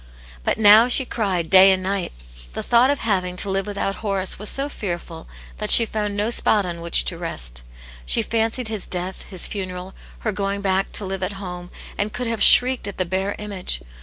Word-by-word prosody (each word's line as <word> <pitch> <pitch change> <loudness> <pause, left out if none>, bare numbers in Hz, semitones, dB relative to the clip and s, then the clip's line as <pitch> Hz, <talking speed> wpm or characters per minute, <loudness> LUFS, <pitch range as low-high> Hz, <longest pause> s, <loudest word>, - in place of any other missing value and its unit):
But - - -1
now 220 +2 +6
she 255 +1 +3
cried 190 -9 -2
day 190 0 +8
and 185 -1 -1
night. 195 -1 -2 0.4
The - - -5
thought 240 +2 +3
of 285 - -1
having 185 -5 -1
to 195 +2 -2
live 195 +1 -2
without 200 -1 -3
Horace 195 -4 -2
was 210 - -1
so 275 +1 0
fearful 175 - -7 0.3
that 210 -1 -4
she 230 - +9
found 210 -2 -4
no 210 +3 -1
spot 210 -3 +1
on 175 -1 -5
whi(di 170 0 +2
to 170 - -2
rest. - - -4 0.4
She - - 0
fancied 230 +2 -2
his 215 -3 -1
death, 180 +1 -4
his 185 -3 -2
funeral, 185 -2 -6 0.3
her 215 - -2
going 200 0 -4
back 195 0 -1
to 205 - -3
live 190 0 -5
at 185 +2 -3
home, 180 -2 -9 0.3
and 205 +1 -1
could 250 - -5
have 230 -2 -4
shrieked 250 -2 +7
at 200 - -8
the 185 - -1
bare 190 +3 -3
image. 195 - -4
195 Hz, 205 wpm, -21 LUFS, 185-215 Hz, 0.4 s, she